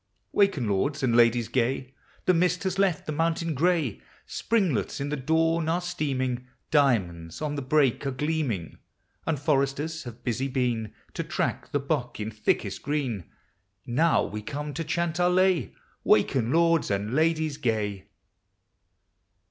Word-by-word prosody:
Waken, 195 - +2
lords 135 +9 0
and 120 -3 +2
ladies 120 -1 +4
gay. 130 +1 -1 0.3
The 185 - +5
mist 180 +2 +2
has 190 0 -1
left 195 -4 +2
the - - -3
mountain 165 +1 0
gray, 155 - +1 0.2
Springlets 190 - 0
in 140 +1 -2
the 150 - -1
dawn 160 +3 +1
arc 175 +2 0
steaming, 130 -7 -2 0.2
Diamonds 95 - +1
on 150 -1 -2
the 145 - -3
brake 135 -1 +2
arc 130 -1 -3
gleaming, 145 - -2 0.5
And 160 -4 0
foresters 145 +2 0
have 120 -1 -9
busy 130 +2 -1
been 120 -5 -1 0.2
To - - -2
track - - -2
the 145 - +1
buck 140 -4 -2
in 105 +1 -3
thickel 105 -1 0
green; 130 - -2 0.6
Now 155 +8 +3
we 105 - -5
come 145 +5 -5
to 165 - -3
chant 170 +1 -1
our 180 0 +4
lay, 185 -5 +2 0.3
"Waken, 120 -3 +3
lords 165 +1 +3
and 100 +3 -1
ladies 155 -1 +1
gay." 105 -7 -1
140 Hz, 150 wpm, -27 LUFS, 120-165 Hz, 0.6 s, The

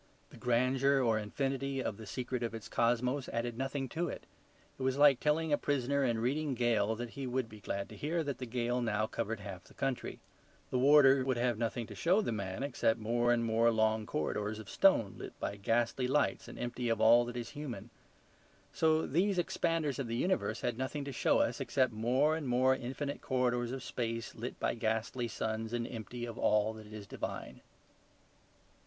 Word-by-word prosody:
The - - -13
grandeur 130 +3 +2
or 115 -2 +2
infinity 135 +5 -2
of 110 -5 -2
the 110 - -10
secret 125 +3 -3
of 115 -1 -2
its 115 - -7
cosmos 125 +3 +1
added 115 0 -2
nothing 135 +2 -2
to 170 +6 -2
it. - - -6 0.6
It - - -7
was 130 +1 +1
like 145 -3 +6
telling 155 +1 +1
a - - +3
prisoner 140 0 +1
in 120 -3 +1
Reading 135 +4 0
gaol 115 -3 +2
that 120 +1 -5
he 135 0 -5
would 125 -1 -1
be 110 -1 -12
glad 100 0 -3
to - - -10
hear 160 +3 -1
that 140 -3 -4
the 125 - -5
gaol 120 +1 -1
now 110 -2 +1
covered 110 -1 -3
half 95 -3 -8
the - - -18
county. 135 -2 -2 0.5
The 125 - +1
warder 135 -1 +6
would 130 -1 0
have 120 -2 0
nothing 115 0 -1
to - - -10
show 180 +5 +3
the 215 - -1
man 100 +1 -3
except 120 -4 +1
more 120 +2 +1
and 120 -1 +2
more 115 +1 +3
long 110 -1 +1
corridors 105 +7 -2
of 110 - -9
stone 115 - +3
lit - - -9
by - - -3
ghastly 120 +5 0
lights 145 +3 +1
and - - -9
empty 120 0 -3
of 115 -1 +1
all 115 +2 +7
that 120 0 -6
is 120 -1 -4
human. 120 -7 -7 0.8
So 160 0 +3
these 185 +7 +1
expanders 165 -5 0
of 135 - -2
the 115 - -2
universe 115 - 0
had 120 -1 -2
nothing 140 +2 -3
to 140 - -4
show 130 - +2
us - - +1
except 130 -3 +1
more 130 +8 +2
and 155 -4 -4
more 130 +2 +4
infinite 135 +3 -4
corridors 125 -2 0
of 130 -1 -5
space 115 -1 -3
lit 120 +2 -6
by - - +1
ghastly 115 +2 -1
suns 110 +1 -3
and 120 -1 -1
empty 120 +1 -6
of 115 -2 -7
all 105 +1 +3
that 110 -1 -11
is 105 -1 -8
divine. - - -6
120 Hz, 200 wpm, -33 LUFS, 115-135 Hz, 0.8 s, all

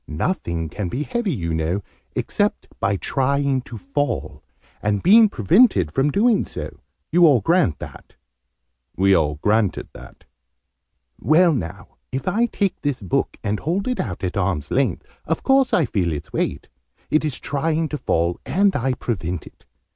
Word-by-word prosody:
Nothing 85 - -2
can 100 +5 -4
be 130 +11 -2
heavy, 240 0 -2
you 85 - -2
know, 80 +5 -1 0.3
except - - -1
by 100 +1 +1
trying 140 +3 0
to 120 -2 -9
fall, 140 +1 -3 0.4
and 105 -1 0
being 220 +3 +7
prevented 115 - +3
from 135 - +1
doing 220 - +3
so. - - -7 0.3
You 175 0 +6
all 140 -5 +5
grant 165 - +2
that?" - - -11 0.8
We 95 +1 +4
all 75 -4 +2
granted 105 -2 +1
that. - - -13 1.0
"Well, 170 +2 +4
now, 100 - -6
if 130 +5 -4
I 225 +6 +2
take 200 -4 -2
this 145 -3 -1
book, 95 -5 -1
and 105 +1 -1
hold 180 - -1
it 250 - -1
out 95 -5 -4
at 90 0 -2
arm's 90 -6 -1
length, 130 -9 0 0.2
of - - -2
course 270 -1 +3
I 165 - +3
feel 95 -7 -1
its 75 - -7
weight. - - -2 0.4
It 155 - +3
is 150 -4 -3
trying 160 +3 -1
to 150 - -3
fall, 85 +1 0
and 195 +2 +2
I 130 -1 0
prevent 90 -9 -3
it. - - -17
130 Hz, 160 wpm, -22 LUFS, -, 1.0 s, being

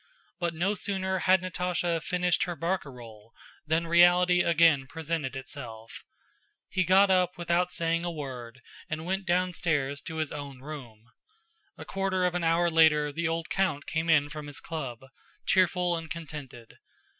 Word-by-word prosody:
But 170 -2 -1
no 185 +5 +1
sooner 190 -2 -2
had 185 0 +4
Natásha 175 -1 -1
finished 180 0 +1
her 175 -2 -4
barcarolle 125 - -5 0.3
than 160 +2 +1
reality 175 +1 +5
again 165 -5 +4
presented 160 -3 -3
itself. 120 -4 -8 0.6
He 185 - +1
got 190 +3 +5
up 180 -1 +2
without 175 +1 +1
saying 165 -1 -1
a 175 - -1
word 130 -6 -7 0.3
and 155 +1 -4
went 190 +1 -2
downstairs 165 -6 0
to 160 - -7
his 155 -2 -2
own 140 -3 -7
room. 120 -6 -10 0.7
A - - -9
quarter 195 -1 -1
of 180 - +1
an 180 -1 -2
hour 165 +1 +2
later 155 -2 +4
the 170 +2 -1
old 165 0 -3
count 185 -7 0
came 160 +1 -2
in 145 -3 +4
from 150 -1 -7
his 145 - -7
club, 135 -8 -6 0.4
cheerful 180 -1 +2
and 165 -1 -6
contented. 150 -8 -9
165 Hz, 155 wpm, -28 LUFS, 145-180 Hz, 0.7 s, reality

